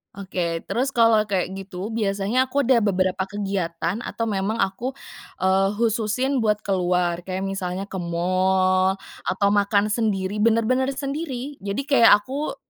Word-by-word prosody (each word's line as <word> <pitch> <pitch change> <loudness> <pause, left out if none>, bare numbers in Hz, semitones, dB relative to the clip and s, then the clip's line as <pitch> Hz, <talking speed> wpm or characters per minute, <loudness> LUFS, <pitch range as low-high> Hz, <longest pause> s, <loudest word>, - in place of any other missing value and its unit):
Oke, 180 -4 -3
terus 270 +3 -2
kalau 230 -2 +4
kayak 190 -2 -1
gitu, 195 +1 -6
biasanya 215 +3 0
aku 280 +2 0
ada 255 -1 +4
beberapa 190 -2 +1
kegiatan 190 -2 -2
atau 230 - -4
memang 205 0 -1
aku, 240 +8 -4 0.5
eee, 190 +1 +3
khususin 235 +4 0
buat 210 -2 0
keluar, 180 -2 0
kayak 190 0 -3
misalnya 195 -1 -3
ke 195 -1 -6
mall, 185 +2 +1 0.3
atau 200 +1 +2
makan 205 0 +2
sendiri, 205 -2 -1
bener-bener 230 +4 +2
sendiri. 275 -1 -5
Jadi, 200 +7 -3
kayak 275 -5 +5
aku 280 +5 -4
200 Hz, 135 wpm, -23 LUFS, 190-230 Hz, 0.5 s, kayak